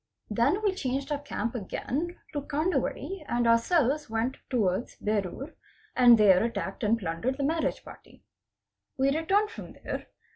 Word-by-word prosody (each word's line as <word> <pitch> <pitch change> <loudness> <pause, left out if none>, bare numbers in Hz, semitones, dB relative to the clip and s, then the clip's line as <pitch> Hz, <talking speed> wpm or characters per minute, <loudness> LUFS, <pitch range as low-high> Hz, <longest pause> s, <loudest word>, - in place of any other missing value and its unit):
Then 235 - +2
we 405 -3 +2
changed 275 -3 -3
our 290 - 0
camp 235 -6 -3
again 275 - -3 0.2
to 290 - -1
Kandwadi 325 +4 -2
and 240 0 +1
ourselves 270 +4 +3
went 225 +4 -1
towards 215 -4 0
Berur 210 - -2 0.4
and 245 -2 +8
there 195 -3 +6
attacked 210 -3 -3
and 220 +2 +3
plundered 210 +7 -2
the 280 - -2
marriage 320 +3 0
party. - - -14 0.7
We 275 +2 +2
returned 395 +7 +2
from - - -9
there. - - -6
260 Hz, 145 wpm, -28 LUFS, 225-305 Hz, 0.7 s, and